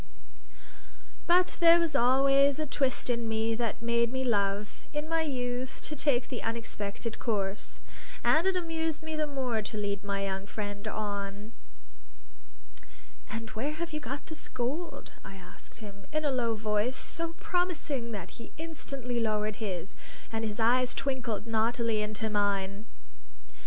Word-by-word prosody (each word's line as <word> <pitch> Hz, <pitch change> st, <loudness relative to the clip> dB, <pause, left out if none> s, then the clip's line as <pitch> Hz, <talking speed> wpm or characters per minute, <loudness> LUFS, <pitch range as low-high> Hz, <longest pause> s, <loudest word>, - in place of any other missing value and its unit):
But 360 Hz, +1 st, +4 dB
there 340 Hz, 0 st, +8 dB
was 330 Hz, -4 st, 0 dB
always 275 Hz, +2 st, +5 dB
a 310 Hz, -, 0 dB
twist 270 Hz, -2 st, 0 dB
in 235 Hz, -2 st, 0 dB
me 220 Hz, +1 st, +1 dB
that 230 Hz, 0 st, -1 dB
made 235 Hz, 0 st, +3 dB
me 260 Hz, 0 st, 0 dB
love 205 Hz, -3 st, +1 dB
(in 300 Hz, +1 st, -2 dB
my 330 Hz, 0 st, +2 dB
youth) 255 Hz, -3 st, -1 dB
to 305 Hz, -, -3 dB
take 270 Hz, -4 st, +2 dB
the 250 Hz, -, -4 dB
unexpected 225 Hz, -1 st, -3 dB
course; 200 Hz, -3 st, -1 dB, 0.4 s
and 325 Hz, +4 st, +5 dB
it 385 Hz, -, +3 dB
amused 325 Hz, -3 st, -1 dB
me 315 Hz, 0 st, -3 dB
the 305 Hz, -1 st, +1 dB
more 255 Hz, -6 st, 0 dB
to 215 Hz, +1 st, -5 dB
lead 200 Hz, -1 st, -1 dB
my 200 Hz, -1 st, -1 dB
young 195 Hz, 0 st, -3 dB
friend 205 Hz, 0 st, -4 dB
on. 205 Hz, 0 st, -3 dB, 1.8 s
"And 225 Hz, +1 st, -5 dB
where 275 Hz, +8 st, -2 dB
have 335 Hz, +1 st, -4 dB
you 305 Hz, -, -1 dB
got 275 Hz, +1 st, -5 dB
this 315 Hz, -, -6 dB
gold?" 280 Hz, +8 st, -3 dB
I 195 Hz, -, -9 dB
asked 180 Hz, -1 st, -11 dB
him, 200 Hz, -1 st, -11 dB
in 310 Hz, 0 st, 0 dB
a 285 Hz, -, +3 dB
low 235 Hz, -3 st, +1 dB
voice 215 Hz, +3 st, +1 dB
so 335 Hz, 0 st, +1 dB
promising 330 Hz, -9 st, -1 dB
that 200 Hz, -6 st, -5 dB
he 230 Hz, -, -10 dB
instantly 275 Hz, -6 st, -3 dB
lowered 215 Hz, -1 st, 0 dB
his, 190 Hz, -4 st, -3 dB, 0.4 s
and 225 Hz, 0 st, -1 dB
his 215 Hz, 0 st, -2 dB
eyes 250 Hz, +2 st, +4 dB
twinkled 260 Hz, -6 st, -1 dB
naughtily 225 Hz, 0 st, +2 dB
into 215 Hz, +1 st, -2 dB
mine. 200 Hz, 0 st, +1 dB
235 Hz, 150 wpm, -30 LUFS, 210-285 Hz, 1.8 s, there